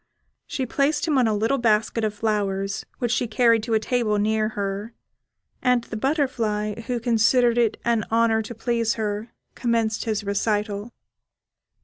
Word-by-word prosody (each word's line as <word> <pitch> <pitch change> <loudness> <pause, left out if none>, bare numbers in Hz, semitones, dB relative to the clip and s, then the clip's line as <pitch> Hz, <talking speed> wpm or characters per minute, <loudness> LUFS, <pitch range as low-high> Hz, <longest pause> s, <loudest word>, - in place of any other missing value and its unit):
She 265 - -2
placed 290 +5 0
him 295 -4 +3
on 245 - +3
a 220 - +1
little 225 +6 +1
basket 225 0 +1
of 215 -1 -1
flowers, 200 -2 -1
which 240 -2 -1
she 245 0 +1
carried 230 0 +3
to 225 +1 -1
a - - +4
table 220 -1 0
near 215 +1 +1
her, 200 +3 -3 0.7
and 250 -2 +2
the 220 - -8
butterfly, 225 -5 0
who 245 -2 -1
considered 235 +1 +3
it 230 -3 +2
an 230 -3 +1
honour 225 -1 +3
to 220 +2 -8
please 230 0 0
her, 215 +1 -3 0.2
commenced 230 -2 0
his 215 -2 -1
recital. 205 +1 -1
225 Hz, 155 wpm, -24 LUFS, 210-240 Hz, 0.7 s, a